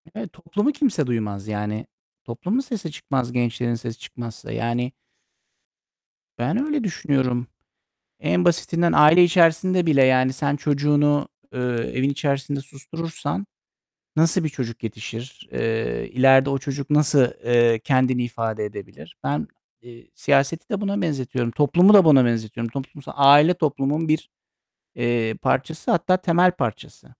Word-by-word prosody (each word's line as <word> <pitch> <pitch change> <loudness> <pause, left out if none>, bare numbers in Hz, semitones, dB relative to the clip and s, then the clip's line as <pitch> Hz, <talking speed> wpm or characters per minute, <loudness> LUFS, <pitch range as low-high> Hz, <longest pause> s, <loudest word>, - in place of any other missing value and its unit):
Evet, 200 -6 -7
toplumu 180 - -1
kimse 255 - -1
duymaz. 105 -4 -3
Yani 105 +1 -4 0.4
toplumun 185 - -3
sesi 220 - -5
çıkmaz, 130 -4 -3
gençlerin 120 -1 -1
sesi 115 -1 -7
çıkmazsa. 115 -2 -9
Yani 120 +2 -2 1.5
Ben 200 - -1
öyle 300 -5 -1
düşünüyorum. 130 - -1 0.7
En 90 +1 +1
basitinden 170 0 +1
aile 165 +4 +7
içerisinde 175 +1 +3
bile 140 -4 +4
yani 130 0 +3
sen 140 +1 -1
çocuğunu, 145 0 +1 0.2
eee, 125 - -5 0.3
evin 130 +2 +1
içerisinde 140 -1 -2
susturursan 145 -4 -6 0.7
nasıl 165 +2 +2
bir - - 0
çocuk 125 -5 -6
yetişir? 115 +4 -8
Eee, 115 - -2
ileride 135 +2 +5
o 135 - 0
çocuk 140 +2 -6
nasıl, 150 -3 +4 0.2
eee, 120 -1 +3
kendini 130 0 +1
ifade 115 -2 -3
edebilir? 105 -2 -10
Ben, 75 +2 -2 0.3
eee, 120 -1 -15
siyaseti 140 - 0
de 205 -3 -3
buna 200 -1 -2
benzetiyorum, 130 -6 -2
toplumu 175 - +4
da 195 -4 +8
buna 135 -5 +6
benzetiyorum. 115 0 -2
Toplums 135 0 -8
aile 145 +5 +6
toplumun 155 -1 -1
bir, 155 0 -1 0.7
eee, 120 -2 0
parçası, 155 +5 -1
hatta 180 +2 +2
temel 180 0 +3
parçası. 120 - -6
135 Hz, 130 wpm, -22 LUFS, 120-165 Hz, 1.5 s, da